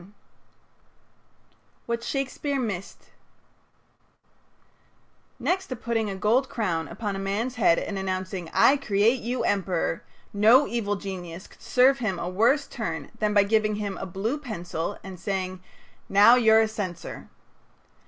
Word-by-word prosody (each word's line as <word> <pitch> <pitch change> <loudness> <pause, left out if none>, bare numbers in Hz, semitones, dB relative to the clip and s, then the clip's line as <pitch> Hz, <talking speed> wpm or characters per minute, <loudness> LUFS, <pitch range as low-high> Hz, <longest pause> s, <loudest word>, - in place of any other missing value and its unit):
XLI 180 - -16 1.8
WHAT 235 0 -2
SHAKESPEARE 275 +2 -2
MISSED 200 -6 -5 2.3
Next 380 +1 -1
to 255 - -4
putting 225 -2 -2
a 195 - -4
gold 230 +7 +2
crown 170 -8 -2
upon 205 +2 -4
a - - -4
man's 205 +6 -2
head 205 -8 +3
and 200 -2 -3
announcing, 185 -2 -3
"I 285 - +5
create 230 -1 +2
you 245 +2 -2
emperor," 185 -4 -1 0.3
no 225 +7 +6
evil 220 -5 -1
genius 185 -3 -7
could - - -19
serve 265 +2 +4
him 205 -6 -1
a 170 - -4
worse 230 +10 +2
turn 165 - -5
than 210 -1 0
by 205 - +6
giving 215 +1 +1
him 205 -2 -3
a 190 - -5
blue 215 - -2
pencil 180 - -4
and 190 -2 -9
saying: 185 0 -3 0.5
"Now 205 +4 +7
you're 225 -3 +6
a 220 - +2
censor." 205 -5 -6
210 Hz, 140 wpm, -26 LUFS, 190-235 Hz, 2.3 s, Now